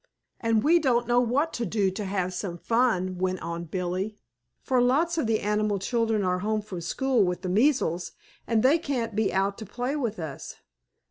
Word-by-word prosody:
"And 230 -1 +1
we 335 +3 +5
don't 245 -6 +1
know 240 0 +4
what 265 +7 +1
to 240 - -2
do 200 -2 +1
to 205 +2 -5
have 185 -2 -2
some 175 -1 -4
fun," 185 -5 +1
went 185 0 0
on 170 0 -4
Billie, 185 +4 -3 0.5
"for 255 -2 +2
lots 320 +7 +2
of 250 - 0
the 220 -1 +1
animal 210 0 +1
children 225 +1 0
are 180 0 +1
home 215 +2 -1
from 185 -4 -7
school 250 +7 +1
with 180 0 -2
the 185 - -2
measles, 200 - +1 0.3
and 225 -2 +2
they 285 +6 +5
can't 245 -9 -2
be 215 -1 +1
out 195 +2 0
to 220 - -6
play 245 +6 -3
with 235 -7 -2
us. 155 -5 -6
215 Hz, 195 wpm, -26 LUFS, 185-245 Hz, 0.5 s, we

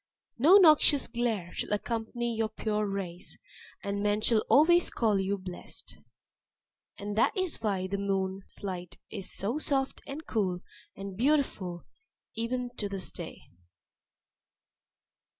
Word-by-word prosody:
No 330 +10 +8
noxious 305 -5 +6
glare 225 -8 -2
shall - - -3
accompany 230 +2 -2
your 220 0 0
pure 215 -1 -1
rays, 190 -3 -4 0.5
and 200 0 -2
men 205 0 +2
shall 225 0 +3
always 345 +4 +6
call 215 -4 +1
you 195 +1 0
'blessed.'" 185 -2 -10 1.0
(And 205 0 -5
that 230 - +2
is 370 -8 -1
why 195 -4 0
the 195 +1 -2
moon's 195 0 -2
light 180 -3 -5
is 195 -4 -4
so 225 +10 -2
soft, 270 -3 0
and 300 +3 -6
cool, 185 -5 -1 0.3
and 195 -1 -7
beautiful 225 - 0 0.5
even 245 +2 -2
to 205 - -1
this 195 -2 -3
day.) - - -8
210 Hz, 130 wpm, -30 LUFS, 195-245 Hz, 1.0 s, No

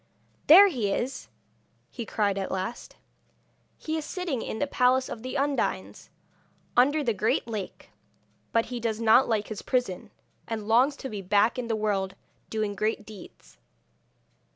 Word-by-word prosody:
'There 385 +6 +10
he 245 - -1
is!' 260 +6 -3 0.6
he 235 -3 -6
cried 205 -3 0
at 195 -1 -3
last. 190 +5 -5 0.8
'He 315 0 -3
is - - -6
sitting 335 -8 -3
in - - -5
the 285 - 0
palace 260 -1 +2
of 220 - -7
the 255 +2 -6
Undines, 280 +1 -2 0.7
under 285 +5 +4
the 235 -4 +1
great 215 +3 0
lake; 215 -4 -6 0.6
but 230 0 +2
he 245 - -3
does 225 -2 -2
not 230 +3 +5
like 215 -2 0
his 215 - -5
prison, 245 -8 -2 0.4
and 220 -2 -4
longs 250 +6 +4
to 270 - -7
be 210 -5 -6
back 205 +6 +2
in 240 - -4
the 225 - 0
world, 195 -3 -1 0.3
doing 215 -2 -2
great 215 +1 -2
deeds.' 175 - -14
225 Hz, 155 wpm, -27 LUFS, 210-255 Hz, 0.8 s, There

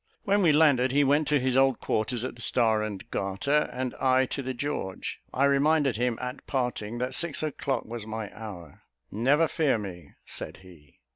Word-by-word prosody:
When 200 +1 +2
we 170 -4 +5
landed, 145 -5 +4
he 145 +2 +4
went 145 +2 +2
to 150 -1 +3
his 130 0 0
old 135 -1 +4
quarters, 115 +2 -1
at - - -4
the 120 - -12
Star 110 -3 +2
and 105 -3 -5
Garter, 100 +10 0
and 125 0 -3
I 130 0 +4
to 140 - -2
the 130 -1 -4
George. 120 -8 -4
I 135 - +2
reminded 140 -1 +3
him, 120 -1 0
at 125 +2 -6
parting, 120 -4 -2
that 125 +2 -2
six 165 +1 +2
o'clock 140 -4 -2
was 115 -1 -7
my 110 -1 -5
hour. 90 -9 -9 0.3
"Never 140 +10 +3
fear 155 -8 +1
me," 90 -7 -8
said - - -5
he. 75 -7 -18
125 Hz, 190 wpm, -27 LUFS, 110-140 Hz, 0.3 s, we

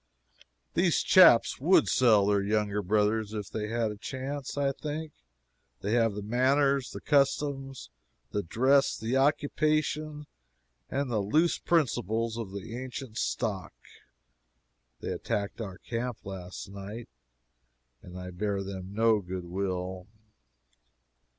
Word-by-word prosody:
These - - +2
chaps - - +6
would - - +4
sell 110 -6 +4
their 100 0 +2
younger 105 0 0
brothers 105 +2 +1
if 105 -2 -5
they 105 -1 -3
had 115 -1 0
a 105 - -8
chance, 135 +5 -5
I 140 -1 +2
think. 150 +2 -5 0.7
They 100 - -2
have 115 -3 +2
the 105 - -5
manners, 135 +4 +2
the - - -8
customs, 135 - 0 0.4
the 105 - 0
dress, 130 +9 +2
the 115 +4 -2
occupation 150 +1 +1 0.6
and 140 -2 -2
the 110 - +1
loose 155 - +2
principles 115 - 0
of 115 -4 -5
the 100 +3 -7
ancient 125 -2 -6
stock. 105 -6 -2 1.3
[They - - -3
attacked 100 +2 -3
our 95 -4 -6
camp 120 +2 -5
last 95 0 -7
night, 100 +4 -8 0.9
and 90 0 -11
I 90 0 -7
bear 100 +2 -2
them 95 0 -7
no 110 -1 +4
good 90 -1 -6
will. 90 0 -3
110 Hz, 125 wpm, -29 LUFS, 100-135 Hz, 1.3 s, chaps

